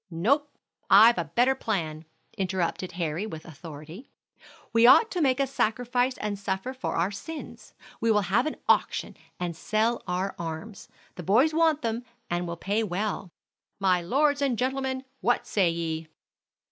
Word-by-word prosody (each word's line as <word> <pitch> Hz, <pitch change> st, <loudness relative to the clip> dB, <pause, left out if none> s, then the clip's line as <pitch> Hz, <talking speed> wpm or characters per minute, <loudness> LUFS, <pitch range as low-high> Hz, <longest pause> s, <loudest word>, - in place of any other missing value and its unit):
"No, 240 Hz, -, +1 dB, 0.4 s
I've 225 Hz, +4 st, +8 dB
a -, -, -1 dB
better 250 Hz, +3 st, +4 dB
plan," 165 Hz, -11 st, -3 dB, 0.3 s
interrupted 185 Hz, -2 st, -2 dB
Harry 170 Hz, +3 st, -2 dB
with 160 Hz, -6 st, -8 dB
authority. 160 Hz, -, -10 dB, 0.6 s
"We 230 Hz, +1 st, +6 dB
ought 450 Hz, -, +7 dB
to 360 Hz, -, -1 dB
make 265 Hz, -2 st, +2 dB
a 275 Hz, -, +3 dB
sacrifice 245 Hz, 0 st, 0 dB
and 205 Hz, -1 st, -3 dB
suffer 195 Hz, +6 st, -3 dB
for 260 Hz, -, -4 dB
our 175 Hz, +4 st, +1 dB
sins. 315 Hz, +10 st, -9 dB, 0.2 s
We 230 Hz, -, +1 dB
will 210 Hz, -2 st, +4 dB
have 200 Hz, +9 st, +1 dB
an 310 Hz, -, -3 dB
auction -, -, +1 dB, 0.2 s
and 175 Hz, -2 st, -3 dB
sell 220 Hz, +7 st, 0 dB
our 185 Hz, +2 st, -1 dB
arms. 170 Hz, +5 st, -6 dB, 0.3 s
The -, -, -5 dB
boys 245 Hz, -, +4 dB
want 320 Hz, -3 st, +2 dB
them, 230 Hz, +1 st, -2 dB, 0.3 s
and 175 Hz, 0 st, -1 dB
will 170 Hz, 0 st, -5 dB
pay 205 Hz, +5 st, 0 dB
well. 205 Hz, -1 st, -2 dB, 0.5 s
My 185 Hz, -2 st, +3 dB
lords 285 Hz, -, +2 dB
and 265 Hz, -4 st, +1 dB
gentlemen, 260 Hz, +1 st, -1 dB, 0.2 s
what 245 Hz, -, +1 dB
say 190 Hz, -5 st, +2 dB
ye?" 165 Hz, -1 st, -3 dB
210 Hz, 160 wpm, -27 LUFS, 175-255 Hz, 0.6 s, I've